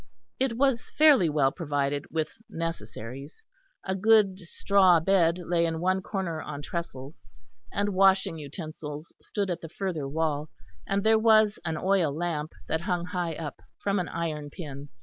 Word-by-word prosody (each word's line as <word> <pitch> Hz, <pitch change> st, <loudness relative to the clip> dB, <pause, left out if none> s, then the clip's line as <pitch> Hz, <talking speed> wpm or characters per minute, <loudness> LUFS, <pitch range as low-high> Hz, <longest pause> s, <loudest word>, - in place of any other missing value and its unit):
It 255 Hz, -3 st, 0 dB
was 270 Hz, -3 st, +1 dB
fairly 290 Hz, -, +6 dB
well 145 Hz, -3 st, +2 dB
provided 145 Hz, -3 st, -1 dB
with 160 Hz, -1 st, -2 dB, 0.2 s
necessaries: 135 Hz, -, -6 dB, 0.4 s
a 190 Hz, -, -1 dB
good 200 Hz, -1 st, +4 dB
straw 185 Hz, 0 st, +4 dB
bed 170 Hz, -1 st, +3 dB
lay 175 Hz, -1 st, 0 dB
in 165 Hz, -1 st, 0 dB
one 185 Hz, +2 st, +1 dB
corner 185 Hz, -5 st, -3 dB
on 145 Hz, -1 st, -6 dB
trestles; 145 Hz, -4 st, -6 dB, 0.4 s
and 205 Hz, +1 st, 0 dB
washing 190 Hz, -2 st, +3 dB
utensils 150 Hz, 0 st, -7 dB
stood 200 Hz, -3 st, -2 dB
at 175 Hz, -, -3 dB
the 165 Hz, -, -8 dB
further 170 Hz, -6 st, -3 dB
wall; 155 Hz, 0 st, -1 dB, 0.4 s
and 200 Hz, 0 st, 0 dB
there 220 Hz, 0 st, +5 dB
was 215 Hz, -2 st, +4 dB
an 160 Hz, -, -2 dB
oil 185 Hz, -3 st, +2 dB
lamp 155 Hz, 0 st, -3 dB
that 160 Hz, -, -1 dB
hung 175 Hz, -2 st, -1 dB
high 175 Hz, -3 st, -2 dB
up 150 Hz, -3 st, -6 dB, 0.2 s
from 200 Hz, 0 st, 0 dB
an 180 Hz, -, -2 dB
iron 155 Hz, -3 st, -3 dB
pin. 145 Hz, -4 st, -8 dB
170 Hz, 155 wpm, -27 LUFS, 150-195 Hz, 0.4 s, fairly